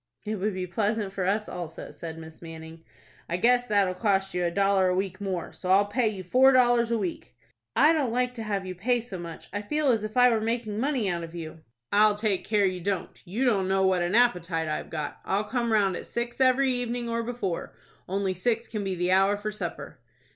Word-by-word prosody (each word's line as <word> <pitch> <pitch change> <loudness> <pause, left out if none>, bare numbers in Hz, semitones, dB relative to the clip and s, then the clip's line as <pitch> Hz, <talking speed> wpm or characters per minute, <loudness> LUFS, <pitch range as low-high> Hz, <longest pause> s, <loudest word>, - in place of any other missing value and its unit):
"It 215 0 -2
would 200 +1 -1
be 185 -1 -2
pleasant 205 +2 -1
for 185 -2 -1
us 210 +2 0
also," 170 -3 -7
said 165 -1 -8
Miss 160 0 -11
Manning. 160 0 -10 0.5
"I 170 - 0
guess 245 +5 +3
that'll 200 -4 +2
cost 195 0 0
you 180 - 0
a 175 - +2
dollar 195 +1 +2
a 180 - +1
week 190 +1 -2
more, 185 -4 -3
so 185 - -6
I'll 195 +2 +5
pay 225 +3 +1
you 200 -3 -3
four 255 +9 +5
dollars 240 -2 +4
a 235 - +1
week." 185 -6 -5 0.4
"I 300 +4 +6
don't 285 -7 0
like 250 +1 0
to 235 - -7
have 200 -3 -2
you 185 - -4
pay 240 +7 +1
so 220 -6 -7
much. 170 -2 -8
I 205 - -2
feel 300 +7 0
as 225 -3 0
if 215 +3 -5
I 250 0 +7
were 225 -2 +1
making 220 -2 -2
money 260 -4 0
out 170 -2 -1
of 165 +1 -9
you." 165 -1 -7 0.3
"I'll 210 0 +5
take 205 -3 0
care 210 -2 +2
you 185 -1 -1
don't. 190 -1 -2
You 215 +9 -1
don't 200 -6 +2
know 190 0 +2
what 185 -1 +2
an 175 +4 0
appetite 180 -9 +2
I've 155 - -3
got. 155 -2 -5
I'll 200 +2 0
come 235 +2 -1
round 200 -4 +3
at - - -7
six 235 +2 -4
every 260 0 +4
evening, 245 -1 -2
or 230 0 -1
before; 230 -7 -4 0.3
only 195 0 0
six 230 +5 -1
can 215 -3 -4
be 190 -1 -2
the 180 +1 0
hour 195 +2 +4
for 215 +1 -4
supper." 210 - -6
205 Hz, 230 wpm, -27 LUFS, 185-235 Hz, 0.5 s, I